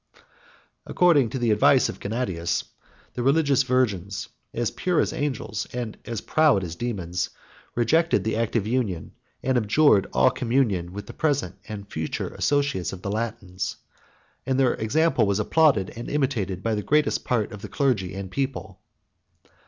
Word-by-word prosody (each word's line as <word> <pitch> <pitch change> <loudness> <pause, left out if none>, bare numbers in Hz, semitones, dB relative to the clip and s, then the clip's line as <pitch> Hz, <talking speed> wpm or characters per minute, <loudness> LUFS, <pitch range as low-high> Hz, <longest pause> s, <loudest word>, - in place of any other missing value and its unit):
According 155 -9 +4
to 130 - -4
the 120 -3 +1
advice 135 +5 +5
of - - -7
Gennadius, 100 -7 -2 0.5
the 125 - -3
religious 140 +1 +3
virgins, 100 -7 0 0.2
as 120 0 -1
pure 180 -3 0
as - - +1
angels, 120 -8 -3
and 120 -3 -4
as 115 -2 -4
proud 150 -11 +3
as 85 -2 -5
dæmons, 90 -5 -3 0.5
rejected 160 +9 +2
the 110 - -1
act 115 0 -1
of 110 -4 +2
union, 110 -8 -1 0.3
and 130 -1 +2
abjured 105 -2 +4
all 65 +1 +4
communion 115 -8 0
with 100 +2 -7
the - - -10
present 140 - -1
and 100 -2 -7
future 80 0 -3
associates 140 -9 0
of 95 -1 -9
the 100 - -2
Latins; 105 -4 -3 0.7
and 135 0 0
their 130 -2 +4
example 135 +3 +2
was 100 -1 +1
applauded 125 -4 +3
and 120 - -6
imitated 115 -11 -1
by 115 - 0
the 105 - -1
greatest 150 +8 +1
part 115 -3 0
of 105 -2 -9
the - - -7
clergy 115 -11 0
and 95 -1 -6
people. 135 -1 -3
115 Hz, 160 wpm, -25 LUFS, 100-135 Hz, 0.7 s, advice